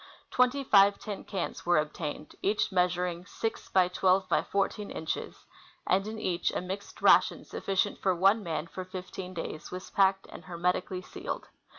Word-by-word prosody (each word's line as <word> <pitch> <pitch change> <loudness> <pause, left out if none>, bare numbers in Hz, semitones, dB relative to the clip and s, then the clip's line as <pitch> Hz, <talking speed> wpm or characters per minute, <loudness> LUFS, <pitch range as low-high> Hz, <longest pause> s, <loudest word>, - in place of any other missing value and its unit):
Twenty 250 +2 +3
five 200 -4 +6
tin 205 -2 -6
cans 190 -3 -4
were 175 -1 +3
obtained, 150 0 -3
each 210 +2 +1
measuring 180 -1 +1
6 225 +2 -4
x 180 -1 +3
12 190 0 +3
x - - +1
14 200 +1 0
inches, 160 - -5 0.4
and 195 +2 +2
in 220 +1 -5
each 180 -5 0
a - - 0
mixed 190 +3 -7
ration - - +5
sufficient 195 +1 -1
for 190 -2 +2
one 195 +5 +4
man 165 -4 -3
for 185 +2 -7
fifteen 185 0 -7
days 165 -1 -5
was 185 +1 -7
packed 195 0 +3
and - - -10
hermetically 180 +1 -1
sealed. - - -6
185 Hz, 165 wpm, -29 LUFS, 180-200 Hz, 0.4 s, five